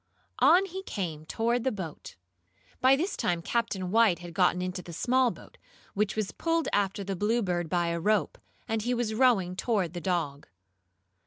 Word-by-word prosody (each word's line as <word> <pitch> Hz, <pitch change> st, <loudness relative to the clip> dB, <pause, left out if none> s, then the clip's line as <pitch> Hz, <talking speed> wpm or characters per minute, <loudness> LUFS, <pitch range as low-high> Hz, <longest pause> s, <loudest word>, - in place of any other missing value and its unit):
On 370 Hz, +3 st, +6 dB
he 380 Hz, 0 st, -6 dB
came 160 Hz, -, -5 dB
toward 235 Hz, +4 st, 0 dB
the 260 Hz, -, +1 dB
boat. 185 Hz, -7 st, -7 dB, 0.6 s
By 260 Hz, +1 st, +5 dB
this 355 Hz, +8 st, -2 dB
time 170 Hz, -1 st, -1 dB
Captain 195 Hz, -6 st, -1 dB
White 220 Hz, -5 st, +4 dB
had 175 Hz, -1 st, -10 dB
gotten 180 Hz, 0 st, +3 dB
into 180 Hz, 0 st, -3 dB
the 175 Hz, -, -10 dB
small 255 Hz, +7 st, +2 dB
boat, -, -, -12 dB, 0.3 s
which 210 Hz, 0 st, 0 dB
was 215 Hz, -2 st, -2 dB
pulled 330 Hz, -1 st, -1 dB
after 200 Hz, 0 st, 0 dB
the 195 Hz, 0 st, -3 dB
Bluebird, 185 Hz, -5 st, 0 dB
by 175 Hz, 0 st, +1 dB
a 170 Hz, 0 st, -1 dB
rope, 210 Hz, +4 st, +1 dB, 0.3 s
and 225 Hz, -1 st, -1 dB
he 245 Hz, +3 st, 0 dB
was 235 Hz, -2 st, -1 dB
rowing 215 Hz, -7 st, +3 dB
toward 190 Hz, -5 st, 0 dB
the 175 Hz, -, -5 dB
dog. 155 Hz, -5 st, -2 dB
200 Hz, 175 wpm, -28 LUFS, 175-240 Hz, 0.6 s, On